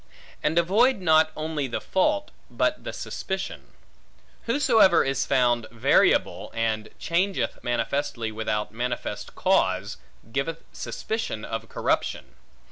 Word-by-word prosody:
And 160 Hz, +2 st, 0 dB
avoid 205 Hz, +8 st, +4 dB
not 160 Hz, -3 st, +4 dB
only 155 Hz, -2 st, -2 dB
the 120 Hz, -, -3 dB
fault, 295 Hz, +10 st, 0 dB, 0.2 s
but -, -, 0 dB
the -, -, -3 dB
suspicion. 190 Hz, 0 st, -5 dB, 0.8 s
Whosoever 230 Hz, -, +5 dB
is 135 Hz, 0 st, -1 dB
found 120 Hz, -4 st, +2 dB
variable, 115 Hz, -1 st, +2 dB
and 110 Hz, -1 st, -1 dB
changeth 185 Hz, +4 st, -1 dB
manifestly 120 Hz, -1 st, -1 dB
without 110 Hz, -1 st, -2 dB
manifest 120 Hz, +3 st, -4 dB
cause, -, -, +1 dB, 0.3 s
giveth 150 Hz, +6 st, -2 dB
suspicion 220 Hz, -, -4 dB
of 115 Hz, -, -5 dB
corruption. -, -, -1 dB
150 Hz, 110 wpm, -25 LUFS, 115-190 Hz, 0.8 s, Whosoever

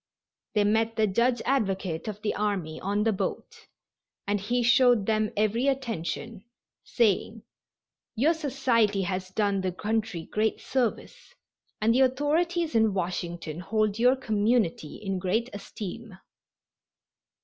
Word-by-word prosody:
They 210 Hz, -, +4 dB
met 225 Hz, +2 st, +1 dB
the 220 Hz, -1 st, +3 dB
Judge 235 Hz, +5 st, +1 dB
Advocate 195 Hz, -10 st, -1 dB
of 210 Hz, 0 st, -6 dB
the 215 Hz, -, 0 dB
army 200 Hz, -7 st, -2 dB
on 205 Hz, +2 st, 0 dB
the 225 Hz, 0 st, +2 dB
boat 190 Hz, -, -5 dB, 0.6 s
and 205 Hz, +1 st, 0 dB
he 240 Hz, +4 st, 0 dB
showed 240 Hz, -3 st, +4 dB
them 215 Hz, 0 st, +1 dB
every 215 Hz, +5 st, +1 dB
attention, 230 Hz, -5 st, -3 dB, 0.4 s
saying: 220 Hz, 0 st, 0 dB, 0.7 s
"Your 285 Hz, +9 st, +3 dB
society 250 Hz, -10 st, +1 dB
has 185 Hz, 0 st, -3 dB
done 200 Hz, 0 st, 0 dB
the 185 Hz, -1 st, -1 dB
country 210 Hz, -2 st, -2 dB
great 215 Hz, +1 st, -1 dB
service, 260 Hz, -, -3 dB, 0.4 s
and 220 Hz, +2 st, +3 dB
the 250 Hz, -, +3 dB
authorities 315 Hz, +6 st, +1 dB
in 220 Hz, -3 st, +3 dB
Washington 175 Hz, -3 st, -3 dB
hold 215 Hz, +2 st, 0 dB
your 250 Hz, +2 st, +5 dB
community 220 Hz, -, 0 dB
in 195 Hz, -2 st, -3 dB
great 220 Hz, +7 st, -1 dB
esteem." 205 Hz, +1 st, -8 dB
215 Hz, 125 wpm, -27 LUFS, 195-240 Hz, 0.7 s, your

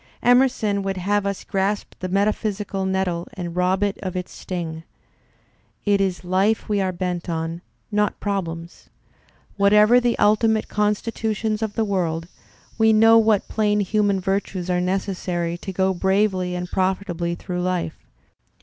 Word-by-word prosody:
Emerson 245 Hz, -5 st, +3 dB
would 195 Hz, -1 st, -3 dB
have 200 Hz, +2 st, 0 dB
us 200 Hz, -1 st, -3 dB
grasp 195 Hz, +2 st, -1 dB
the 185 Hz, -, -4 dB
metaphysical 200 Hz, 0 st, -1 dB
nettle 185 Hz, -3 st, -1 dB
and 175 Hz, -2 st, -5 dB
rob 185 Hz, +2 st, +1 dB
it 205 Hz, -1 st, -1 dB
of 185 Hz, -2 st, -4 dB
its 180 Hz, 0 st, -4 dB
sting. 165 Hz, -3 st, -5 dB, 1.0 s
4 205 Hz, -, +3 dB
It 200 Hz, -, +3 dB
is 190 Hz, -2 st, -1 dB
life 190 Hz, +5 st, +1 dB
we 205 Hz, -2 st, +1 dB
are 190 Hz, -1 st, 0 dB
bent 180 Hz, -1 st, -3 dB
on, 165 Hz, +1 st, -3 dB, 0.3 s
not 210 Hz, 0 st, 0 dB
problems. 170 Hz, -4 st, -4 dB, 0.7 s
Whatever 210 Hz, +4 st, +6 dB
the 240 Hz, -1 st, +1 dB
ulti 210 Hz, +2 st, +4 dB
mate 220 Hz, -1 st, 0 dB
constitution 215 Hz, +1 st, -1 dB
of 220 Hz, -2 st, -3 dB
the 225 Hz, -, +1 dB
world, 170 Hz, -5 st, -1 dB, 0.5 s
we 220 Hz, 0 st, +5 dB
know 225 Hz, +1 st, +6 dB
what 220 Hz, -2 st, +2 dB
plain 210 Hz, -1 st, +1 dB
human 200 Hz, 0 st, +1 dB
virtues 190 Hz, -1 st, -2 dB
are 180 Hz, 0 st, +1 dB
necessary 180 Hz, -2 st, -2 dB
to 195 Hz, -, -6 dB
go 190 Hz, +1 st, +1 dB
bravely 190 Hz, -1 st, +1 dB
and 180 Hz, 0 st, -5 dB
profitably 185 Hz, -2 st, -1 dB
through 180 Hz, 0 st, -4 dB
life. 180 Hz, -3 st, -3 dB
195 Hz, 150 wpm, -22 LUFS, 180-210 Hz, 1.0 s, Whatever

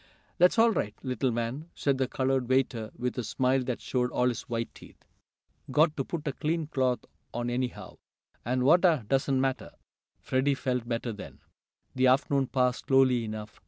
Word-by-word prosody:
"Dat's 180 Hz, +6 st, +5 dB
all 230 Hz, +1 st, +6 dB
right, 105 Hz, -, -2 dB
little 130 Hz, -1 st, 0 dB
man," 120 Hz, +7 st, -3 dB
said 140 Hz, -2 st, 0 dB
the 130 Hz, -, +1 dB
colored 130 Hz, -1 st, 0 dB
waiter 125 Hz, -4 st, +1 dB
with 125 Hz, +1 st, -2 dB
a -, -, -2 dB
smile 130 Hz, +3 st, +1 dB
that 125 Hz, -2 st, -2 dB
showed 125 Hz, -1 st, -1 dB
all 125 Hz, 0 st, +1 dB
his 120 Hz, -, -3 dB
white 115 Hz, -1 st, -3 dB
teeth. -, -, -16 dB, 0.6 s
"Got 155 Hz, +1 st, +3 dB
t' 135 Hz, -, -1 dB
put 155 Hz, +2 st, -5 dB
a 140 Hz, -, -1 dB
clean 160 Hz, +3 st, -1 dB
cloth 130 Hz, -4 st, 0 dB, 0.3 s
on 120 Hz, 0 st, -2 dB
anyhow, 125 Hz, 0 st, -4 dB, 0.5 s
an' 125 Hz, +2 st, 0 dB
watah 160 Hz, -, +4 dB
doesn't 135 Hz, +1 st, +1 dB
matter." 135 Hz, -1 st, -1 dB, 0.5 s
Freddie 135 Hz, +2 st, +1 dB
felt 125 Hz, -3 st, -2 dB
better 115 Hz, 0 st, -2 dB
then. 105 Hz, -, -10 dB, 0.6 s
The 130 Hz, 0 st, +3 dB
afternoon 135 Hz, +1 st, +2 dB
passed 125 Hz, -1 st, 0 dB
slowly 130 Hz, -3 st, +4 dB
enough. 105 Hz, -1 st, -7 dB
130 Hz, 170 wpm, -28 LUFS, 120-135 Hz, 0.6 s, all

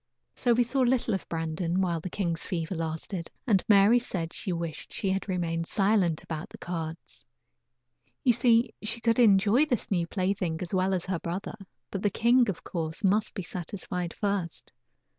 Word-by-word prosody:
So 240 Hz, -, +2 dB
we 245 Hz, +1 st, +4 dB
saw 250 Hz, +4 st, -2 dB
little 250 Hz, -3 st, +2 dB
of 190 Hz, -, -4 dB
Brandon 165 Hz, +2 st, -1 dB
while 175 Hz, -3 st, +1 dB
the 185 Hz, -, -5 dB
king's 170 Hz, -3 st, -1 dB
fever 170 Hz, 0 st, -3 dB
lasted, 165 Hz, +1 st, -4 dB, 0.2 s
and 205 Hz, -7 st, +3 dB
Mary 205 Hz, +3 st, +6 dB
said 175 Hz, -8 st, -4 dB
she 190 Hz, -, -4 dB
wished 170 Hz, -2 st, -4 dB
she 195 Hz, -, -1 dB
had 195 Hz, +1 st, -2 dB
remained 165 Hz, -2 st, -1 dB
silent 195 Hz, -6 st, +2 dB
about 160 Hz, 0 st, -5 dB
the -, -, -11 dB
cards. 165 Hz, -2 st, -6 dB, 1.0 s
You 245 Hz, -, +5 dB
see, 235 Hz, 0 st, +3 dB
she 230 Hz, +2 st, -2 dB
could 230 Hz, +1 st, +2 dB
enjoy 220 Hz, +5 st, +5 dB
this 245 Hz, -7 st, -2 dB
new 175 Hz, -3 st, +1 dB
plaything 185 Hz, -3 st, -1 dB
as 175 Hz, -, -6 dB
well 190 Hz, +1 st, +2 dB
as 180 Hz, -, -3 dB
her 180 Hz, -2 st, -2 dB
brother; 175 Hz, +4 st, -4 dB, 0.4 s
but 195 Hz, -, -3 dB
the 205 Hz, -, +2 dB
king, 235 Hz, +3 st, +3 dB
of 195 Hz, -, -4 dB
course, 160 Hz, +3 st, -4 dB
must 205 Hz, +2 st, +2 dB
be 190 Hz, -, -3 dB
satisfied 180 Hz, 0 st, -5 dB
first. 200 Hz, -5 st, -3 dB
190 Hz, 180 wpm, -28 LUFS, 170-215 Hz, 1.0 s, Mary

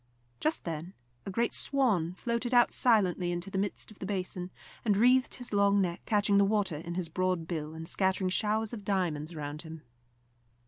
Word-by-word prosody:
Just 310 Hz, +1 st, 0 dB
then 165 Hz, +2 st, -5 dB, 0.3 s
a -, -, -2 dB
great 230 Hz, +4 st, 0 dB
swan 210 Hz, -, +1 dB
floated 235 Hz, +3 st, -1 dB
out 240 Hz, -, +6 dB
silently 185 Hz, -7 st, +2 dB
into 175 Hz, +3 st, -4 dB
the 190 Hz, -, -1 dB
midst 205 Hz, +2 st, -3 dB
of 215 Hz, -, -16 dB
the 190 Hz, -, -5 dB
basin, 185 Hz, -2 st, -3 dB, 0.3 s
and 205 Hz, -4 st, +2 dB
wreathed 255 Hz, +4 st, +4 dB
his 245 Hz, -4 st, -6 dB
long 200 Hz, 0 st, +4 dB
neck, 175 Hz, -3 st, -1 dB
catching 205 Hz, -1 st, +3 dB
the -, -, +6 dB
water 200 Hz, -5 st, +1 dB
in 170 Hz, +2 st, -6 dB
his 180 Hz, -2 st, -2 dB
broad 180 Hz, 0 st, -1 dB
bill, 160 Hz, -2 st, -4 dB
and 160 Hz, 0 st, -7 dB
scattering 190 Hz, 0 st, 0 dB
showers 215 Hz, +3 st, 0 dB
of 210 Hz, -3 st, -6 dB
diamonds 175 Hz, -6 st, -1 dB
around 150 Hz, -2 st, -5 dB
him. 160 Hz, -2 st, -9 dB
190 Hz, 185 wpm, -30 LUFS, 170-215 Hz, 0.3 s, out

